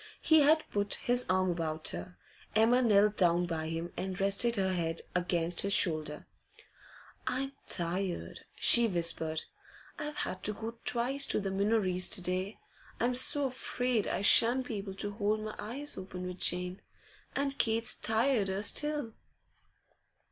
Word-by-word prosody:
He 315 -1 +5
had 305 +2 +4
put 205 0 0
his 245 0 -1
arm 185 0 +1
about 160 -2 -2
her. 180 - -8 0.4
Emma 230 +3 +4
knelt 210 -3 +3
down 175 -1 +3
by 160 -2 -4
him, 165 +1 -5
and 190 +1 -5
rested 200 +4 +3
her 190 -2 0
head 165 -2 -2
against 175 -1 +1
his 200 0 +3
shoulder. 155 -4 +1 1.0
'I'm 270 +2 -2 0.2
tired,' 180 +1 -2 0.2
she 235 -1 +5
whispered. 165 -4 -1 0.6
'I've 300 0 -6
had 185 - -3
to 210 - -2
go 230 +2 -8
twice 255 +3 0
to - - 0
the 195 -2 -3
Minories 195 -2 +2
to - - +4
day. 185 +4 -2 0.4
I'm 245 +2 +1
so 275 +3 +2
afraid 250 -3 -2
I 195 - -2
shan't 240 +5 +5
be 230 -4 -5
able 195 -1 -7
to 205 +1 -3
hold 210 +1 -1
my 215 0 -6
eyes 275 +7 -5
open 185 -1 -8
with 180 0 -7
Jane, 180 +1 -1 0.5
and 275 0 -2
Kate's 225 0 +2
tireder 220 -4 0
still. 295 0 +3
200 Hz, 150 wpm, -31 LUFS, 180-240 Hz, 1.0 s, He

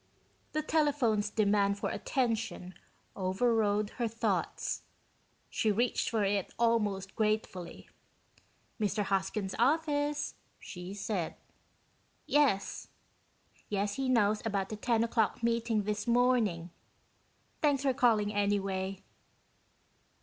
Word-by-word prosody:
The 310 - 0
telephone's 280 -10 +2
demand 200 -1 +2
for - - -2
attention 225 -7 -2 0.4
overrode 205 +1 +1
her 235 - +2
thoughts. 230 +1 -1 0.7
She 215 - +1
reached 235 +4 +1
for 220 -2 +1
it 200 -1 0
almost 210 -5 +1
gratefully. 215 -5 -2 0.9
"Mr. 210 0 0
Hoskins' 195 0 -1
office," 290 +2 +1 0.3
she 180 +1 -8
said. 200 -4 -2 0.9
"Yes. 275 -10 +1 0.8
Yes, 205 0 0
he 270 -1 -1
knows 215 -4 +3
about 200 -4 -1
the 215 - -4
ten 230 +1 +1
o'clock 230 0 0
meeting 230 -2 +1
this 210 +2 -2
morning. 235 -8 +2 0.9
Thanks 285 -3 +2
for 270 -2 +2
calling, 215 -4 +3
anyway." 195 -2 -1
215 Hz, 100 wpm, -31 LUFS, 200-240 Hz, 0.9 s, knows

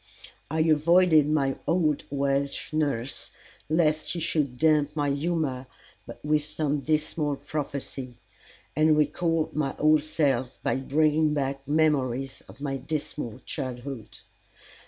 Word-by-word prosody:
I 160 +1 0
avoided 160 0 +5
my 140 -3 +1
old 160 -4 +1
Welsh 140 +1 -1
nurse, 140 -5 -1 0.4
lest 155 -1 +2
she 175 - -2
should 150 -6 -1
damp 150 0 +3
my 145 -2 +1
humor 145 -4 -1 0.6
with 150 0 +2
some 150 -1 -1
dismal 155 0 0
prophecy, 140 -3 -5 0.6
and 155 +1 +4
recall 160 +2 +1
my 140 -3 -1
old 155 0 +4
self 140 -5 0
by - - +1
bringing 150 +3 +2
back 135 -1 -2
memories 135 -4 +1
of - - -14
my 135 -2 -2
dismal 145 -5 -5
childhood. 130 -3 -6
150 Hz, 115 wpm, -27 LUFS, 135-155 Hz, 0.6 s, avoided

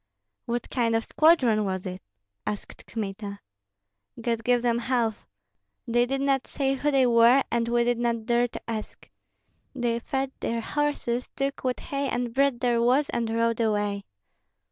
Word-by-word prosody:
"What 240 -1 -3
kind 230 -3 +1
of 225 - +1
a - - -13
squadron 255 -10 +4
was 190 -1 -3
it?" 185 0 -5 0.5
asked 210 - -6
Kmita. 200 -2 -5 0.8
"God 230 -1 -1
give 245 +1 +2
them 235 -1 +2
health! 235 -3 -1 0.6
They 240 +1 +2
did 270 +1 -1
not 275 -1 +1
say 270 -1 0
who 280 +2 0
they 270 -3 +4
were, 240 +3 +6
and 235 0 +1
we 240 0 +2
did 240 0 +1
not 235 -2 -1
dare 240 +1 +2
to - - -8
ask. 220 -2 -6 0.7
They 240 -2 0
fed 270 +2 -2
their 230 0 -2
horses, 255 -2 -1
took 275 0 -2
what 255 -1 -1
hay 275 -1 -3
and 240 -1 -2
bread 275 -1 +2
there 240 -2 +2
was, 260 +5 +3
and 235 -1 -1
rode 230 0 +1
away." 205 -3 0
235 Hz, 165 wpm, -26 LUFS, 230-260 Hz, 0.8 s, were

